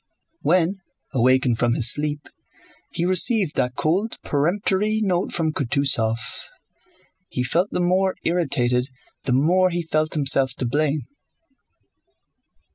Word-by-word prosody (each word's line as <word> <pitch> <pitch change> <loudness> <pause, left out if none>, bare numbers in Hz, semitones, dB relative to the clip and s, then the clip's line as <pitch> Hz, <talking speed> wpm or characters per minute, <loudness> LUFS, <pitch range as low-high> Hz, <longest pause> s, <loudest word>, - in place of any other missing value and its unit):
When, 180 +2 +1 0.4
awakened 130 -1 +2
from 120 -1 +1
his 120 +1 +5
sleep, 145 0 -2 0.6
he 170 - -2
received 185 - +3
that 125 0 -1
cold, 170 - -1
peremptory 195 +7 0
note 185 -3 -1
from 160 -2 -1
Kutúzov, 130 -5 +1 1.1
he 125 - -2
felt 170 +9 0
the 180 - -2
more 185 +2 +1
irritated 135 -7 0 0.4
the 130 - 0
more 175 +8 +3
he 175 -1 -2
felt 155 -1 -1
himself 135 -2 +1
to 130 - -3
blame. 145 +3 0
155 Hz, 120 wpm, -22 LUFS, 130-180 Hz, 1.1 s, his